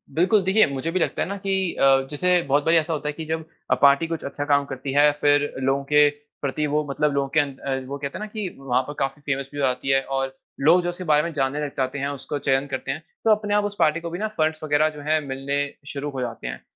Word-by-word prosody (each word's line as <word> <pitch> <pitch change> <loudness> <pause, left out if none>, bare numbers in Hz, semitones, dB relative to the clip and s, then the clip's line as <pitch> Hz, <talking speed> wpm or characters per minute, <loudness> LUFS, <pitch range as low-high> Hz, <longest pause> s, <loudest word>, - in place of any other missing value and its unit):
बिल्कुल। 190 +6 +4
देखिये 195 +4 +4
मुझे 140 +4 -3
भी 185 - 0
लगता - - -1
है - - 0
ना 200 +2 -4
कि 190 -2 -1
अ, 135 -1 +3
जैसे 180 +4 +2
बहुत 145 -1 +1
बारी 165 +1 +5
ऐसा 165 +1 +1
होता 150 -1 -2
है - - -3
की 160 +1 -7
जब 160 0 -3 0.3
अ, - - +6
पार्टी 140 +3 +5
कुछ 165 -1 -4
अच्छा 145 +1 -4
काम 140 -1 +3
करती 135 0 -5
है 145 +1 +6
फिर 145 0 +3
लोगों 135 +1 +1
के 150 0 +7 0.3
प्रति 145 +2 -1
वो 150 +1 +1
मतलब 150 +1 +1
लोगों 140 0 0
के - - +8
अन 140 -2 0
अ, 135 -1 -2
वो 140 +1 -5
कहते 140 0 -5
है - - -5
ना - - -5
कि 215 -2 -4
वहाँ 130 -2 +1
पे 145 - -7
काफ़ी 135 +2 -2
फेमस 140 -1 -2
भी 145 - -5
हो 140 - +2
जाती 130 +1 -1
है। 135 0 +4
और 135 0 -3 0.2
लोग 165 +6 +5
जो 175 - -1
उसके 175 +1 -6
बारे 150 -3 +3
में 170 0 -4
जानने 140 0 0
लग 145 - -5
जाते 130 +1 -1
हैं, 140 - -1
उसको 145 +1 -5
चयन 135 0 +1
करते 130 -2 -3
हैं, 155 - -5 0.2
तो 225 - +4
अपने 210 -1 +1
आप 210 0 +2
उस 205 0 -4
पार्टी 160 -1 +3
को 170 - -5
भी 175 +2 -5
ना 215 - 0
फंड्स 155 0 0
वगैरह 155 0 +3
जो 150 -1 -10
है 155 0 +3
मिलने 135 +1 -3 0.3
शुरू 145 -1 -4
हो 135 -2 -4
जाते 120 -2 -5
हैं। - - -6
145 Hz, 280 wpm, -23 LUFS, 135-165 Hz, 0.3 s, के